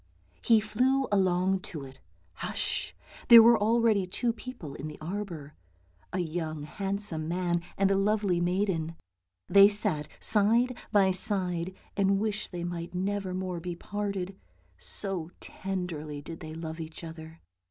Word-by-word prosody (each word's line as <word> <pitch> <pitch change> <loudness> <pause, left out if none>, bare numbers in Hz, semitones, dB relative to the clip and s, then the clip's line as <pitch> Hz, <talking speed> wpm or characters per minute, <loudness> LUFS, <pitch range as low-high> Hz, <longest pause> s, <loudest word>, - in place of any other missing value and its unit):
He 225 -1 +5
flew 255 +6 +1
along 190 -1 +2
to 155 -5 -7
it. 135 0 -13 0.3
Hush! - - -2 0.3
There 235 -1 +11
were 235 +1 +7
already 220 -2 +2
two 235 +5 0
people 230 - -8
in 145 - -6
the 150 - -8
arbour, 170 -4 -5 0.6
a - - -3
young 160 -3 -3
handsome 195 -1 -2
man 175 0 0 0.2
and 195 0 +3
a - - +3
lovely 200 -2 +1
maiden. 175 -3 0 0.5
They 200 0 +8
sat 155 -8 0
side 230 +4 +4 0.2
by 195 -2 +4
side 185 -2 +1 0.2
and 195 -1 +3
wished 215 0 -2
they 175 -2 -5
might 175 0 -5
never 190 0 -2
more 185 -2 -3
be 175 +1 -5
parted, 195 0 -4 0.4
so 165 - -3
tenderly 170 -6 -5
did 165 +3 -8
they 155 -1 -8
love 160 0 -6
each 160 +1 -7
other. 160 0 -9
185 Hz, 140 wpm, -29 LUFS, 165-205 Hz, 0.6 s, There